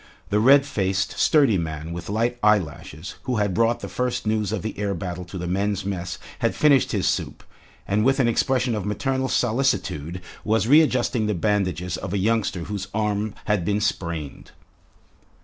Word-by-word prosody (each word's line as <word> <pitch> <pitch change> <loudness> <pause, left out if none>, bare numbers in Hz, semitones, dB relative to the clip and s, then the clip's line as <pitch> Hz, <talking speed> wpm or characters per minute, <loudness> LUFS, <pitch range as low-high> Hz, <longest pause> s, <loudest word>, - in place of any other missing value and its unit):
The 105 - +3
red 135 +5 +6
faced, 100 -7 -1
sturdy 140 - +4
man 80 0 -4
with 85 +1 -7
light 120 +4 0
eyelashes 85 -5 0
who 130 -2 -1
had 105 -3 0
brought 115 +3 +2
the - - -5
first 125 -2 -2
news 110 -2 0
of 110 -3 -3
the 110 - -4
air 100 -1 -1
battle 90 +1 -5
to 95 +2 -8
the 90 - -4
men's 95 +2 -1
mess 90 -3 -3 0.2
had - - 0
finished 140 -4 +4
his - - 0
soup, - - -2 0.4
and 105 +2 +1
with 135 +3 +3
an 125 - +3
expression 125 +1 +1
of 105 -3 -2
maternal 130 +7 -1
solicitude 100 - 0 0.2
was 110 +1 +1
readjusting 130 -6 +3
the 105 - 0
bandages 90 -2 0
of 90 - -5
a - - +1
youngster 100 -3 0
whose 100 0 -5
arm 105 0 -1
had 105 -4 +1
been 105 +3 0
sprained. 85 -8 -3
105 Hz, 175 wpm, -23 LUFS, 90-115 Hz, 0.4 s, red